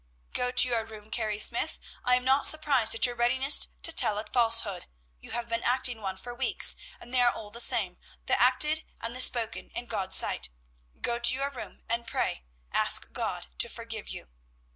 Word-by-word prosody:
_" - - -25
"Go 250 - -1
to 250 0 +5
your 235 -2 -1
room, 220 -1 -14
Carrie 215 -3 -3
Smyth. 210 - -1 0.3
I 250 - +2
am 250 0 -3
not 270 +2 +3
surprised 280 -8 +3
at 230 - +4
your 245 - -2
readiness 260 +4 +3 0.2
to 330 - +3
tell 220 -8 +4
a 215 - -4
falsehood; 225 -6 +2 0.3
you - - -9
have 240 0 -4
been 230 0 -3
acting 245 -2 -1
one 190 -2 -5
for 245 +5 -10
weeks, 260 +2 +4 0.2
and 240 - -14
they 255 - +2
are 245 - +3
all 210 -1 -10
the 235 - -4
same, 185 -7 +1 0.3
the - - 0
acted 300 +5 +2 0.2
and 230 +1 -5
the 255 - -2
spoken, 230 -3 +2
in 245 - -6
God's 200 -5 -1
sight. - - +3 0.5
Go 235 0 -2
to 240 +1 +5
your 275 +1 -4
room 260 - -11
and 235 0 -3
pray; 60 - -4 0.3
ask - - +1
God - - -5
to - - +2
forgive - - -8
you." - - -9
240 Hz, 205 wpm, -27 LUFS, 220-255 Hz, 0.5 s, to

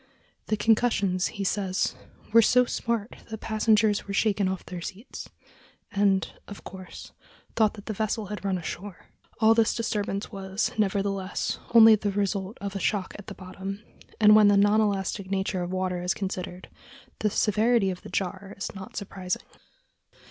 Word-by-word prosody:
"The 215 - 0
concussions," 210 -5 +2
he 200 - -2
says, 190 -1 0 0.4
"were 230 - +8
so 250 +3 +4
smart 235 -2 -2
that 220 - -5
passengers 215 -1 +2
were 200 - -3
shaken 205 -2 +2
off 190 0 -3
their 180 -1 -7
seats, 210 +8 -8 0.6
and, 200 -2 +2 0.2
of 205 - -10
course, 185 -1 -10 0.4
thought 215 -2 +3
that 205 - -11
the 220 - -3
vessel 215 +1 -1
had 210 +1 -6
run 195 -2 0
ashore." 180 +2 -7 0.3
All 220 0 +6
this 225 -1 +2
disturbance 210 -3 -2
was, 195 0 -2
nevertheless, 195 -2 -1 0.2
only 225 -1 +10
the 210 -1 +1
result 200 +1 -2
of 200 0 -5
a - - -2
shock 195 0 -1
at 205 - -11
the - - -7
bottom; 195 +2 -7 0.4
and 210 -1 +7
when 215 -1 +7
the 205 -1 +5
non 205 +2 +4
elastic 195 -2 -1
nature 190 -1 -1
of 175 - -3
water 185 -1 -1
is 180 +1 0
considered, 185 -2 -5 0.5
the 210 - +1
severity 215 0 +2
of 180 - -7
the - - -10
jar 195 +1 -3
is 200 - -5
not 190 -2 -9
surprising. 190 -2 -4
200 Hz, 165 wpm, -27 LUFS, 190-215 Hz, 0.6 s, only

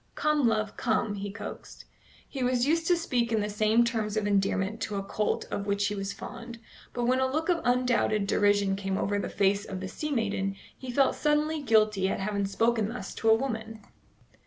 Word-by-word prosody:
"Come, 300 -4 +2
love, 215 -2 -1
come," 220 -2 0
he 200 0 -5
coaxed. 200 +3 -9 0.4
He 270 - -6
was 250 0 +2
used 325 +3 +1
to 355 - +4
speak 245 -8 -1
in 220 - +2
the 210 0 -2
same 215 +3 +3
terms 220 -3 -2
of 215 - 0
endearment 200 +1 0
to 210 - -3
a 195 - -2
colt 210 +2 -1
of 200 - -3
which 200 0 +1
he - - -3
was 195 -1 -3
fond; 235 +3 -8 0.3
but 245 - -3
when 255 +2 +2
a 260 0 +1
look 315 +5 -1
of 340 -2 +2
undoubted 245 -4 +2
derision 205 -1 +2
came 195 -1 -2
over 205 0 0
the - - -3
face 200 0 +1
of 190 -3 -6
the 190 - -5
sea 305 +10 -5
maiden, 200 -6 -1 0.2
he 260 - -9
felt 270 +2 +3
suddenly 300 +1 +1
guilty 215 -6 +3
at - - -2
having 200 0 -1
spoken 220 +2 +1
thus 225 -5 -6
to 225 - 0
a 220 - +7
woman. 225 -3 -4
220 Hz, 205 wpm, -28 LUFS, 200-250 Hz, 0.4 s, a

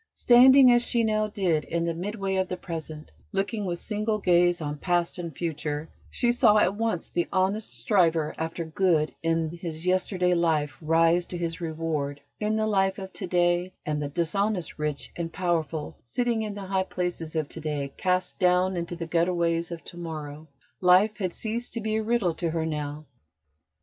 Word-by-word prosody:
Standing, 255 +1 +7
as 240 0 +5
she 235 -1 +1
now 215 -1 +1
did, 180 -7 0
in 170 0 -2
the 170 - -1
midway 195 +2 -3
of 190 0 +1
the 180 - -4
present, 160 -3 -7 0.2
looking 200 +2 -1
with 175 -2 -2
single 215 +3 -1
gaze 175 -2 +3
on 150 -2 -4
past 175 +1 0
and 170 -4 -6
future, 150 -2 -3 0.2
she 240 - +1
saw 230 -3 +5
at 195 -2 +3
once 220 -4 -2
the 175 - -1
honest 190 - 0
striver 165 - +2
after 165 +1 -4
good 160 -2 +1
in 165 -1 0
his 170 -1 -5
yesterday 185 0 +1
life 160 -4 +1
rise 165 +2 +3
to 175 - -5
his 170 0 -3
reward 155 -3 -3 0.2
in 215 0 0
the 220 0 +1
life 195 -2 +1
of 190 -1 -8
to 190 - -4
day, 175 +1 +1
and 150 -1 -1
the 145 - -3
dishonest 180 +3 -1
rich 150 -2 -2
and 165 -1 -4
powerful 165 -3 -2
sitting 230 - -1
in 210 -2 -4
the 205 - -6
high 190 0 0
places 175 -3 -3
of 155 -2 0
to - - -7
day 145 -3 -3
cast 185 -1 -1
down 180 +1 +3
into 170 0 -3
the 170 -1 -5
gutterways 170 0 +1
of 170 -1 -6
to 175 - -9
morrow. 155 -2 -7 0.3
Life 185 +4 +4
had 185 -4 -2
ceased 230 +6 -4
to 230 - -2
be 220 0 -1
a 220 - -1
riddle 215 -6 +1
to 170 0 -2
her 160 0 -1
now. 150 -1 -4
175 Hz, 185 wpm, -26 LUFS, 160-195 Hz, 0.3 s, Standing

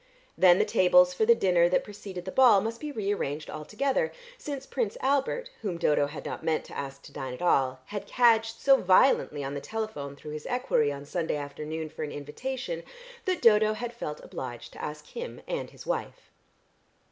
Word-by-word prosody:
Then 180 -1 +6
the - - +3
tables 180 0 +5
for 215 +4 +1
the 235 - +7
dinner 175 -4 +3
that 185 - +2
preceded 195 -3 -8
the 185 - -4
ball 245 -5 +6
must 225 +3 -3
be 300 -1 -5
re 205 -6 -1
arranged 150 -5 -4
altogether, 270 - -1 0.2
since 285 - -6
Prince 235 -7 -2
Albert, 285 - 0
whom 195 -6 -3
Dodo 150 -3 +2
had 145 - -8
not - - -5
meant 160 -1 0
to - - -11
ask 135 0 -6
to - - -13
dine 130 -1 -5
at - - -12
all, 130 -6 +2
had 205 +5 -6
cadged 225 -2 +3
so 270 -1 +6
violently 185 - +3
on 135 +1 -4
the 140 - -4
telephone 215 -11 -5
through 150 +2 -9
his 150 0 -6
equerry 245 - +1
on 140 0 -7
Sunday 165 +2 -2
afternoon 150 +2 -5
for 155 - -9
an 150 -1 -3
invitation, 260 - -5 0.4
that 370 -1 -1
Dodo 215 -1 +6
had 240 +2 -5
felt 150 -10 -5
obliged 120 -2 -7
to - - -9
ask 150 0 -5
him 485 +1 -7
and - - -3
his - - -13
wife. - - -4
185 Hz, 195 wpm, -28 LUFS, 150-240 Hz, 0.4 s, the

